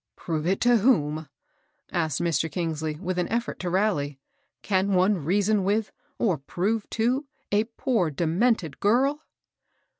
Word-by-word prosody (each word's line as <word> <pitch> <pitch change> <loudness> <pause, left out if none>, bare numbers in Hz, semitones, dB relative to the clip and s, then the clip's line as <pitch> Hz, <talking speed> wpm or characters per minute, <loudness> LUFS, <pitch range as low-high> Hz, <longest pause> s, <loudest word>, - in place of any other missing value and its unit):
"Prove 160 -1 -3
it 190 +1 +1
to 245 - +4
wtom?" 155 - +2 0.6
asked 160 -6 0
Mr. 165 -2 0
Kingsley, 160 -3 -2
with 180 +2 -3
an 175 - 0
effort 235 +2 -2
to 180 - -2
rally. 170 -8 0 0.4
"Can 195 0 +1
one 185 -2 +2
reason 200 +5 +2
with, 205 +3 0 0.3
or 185 - +1
prove 200 +9 -2
to, 255 +6 +1 0.2
a 210 +2 +3
poor 225 -11 +1
demented 170 - 0
girl?" 270 +8 +2
185 Hz, 140 wpm, -26 LUFS, 160-215 Hz, 0.6 s, to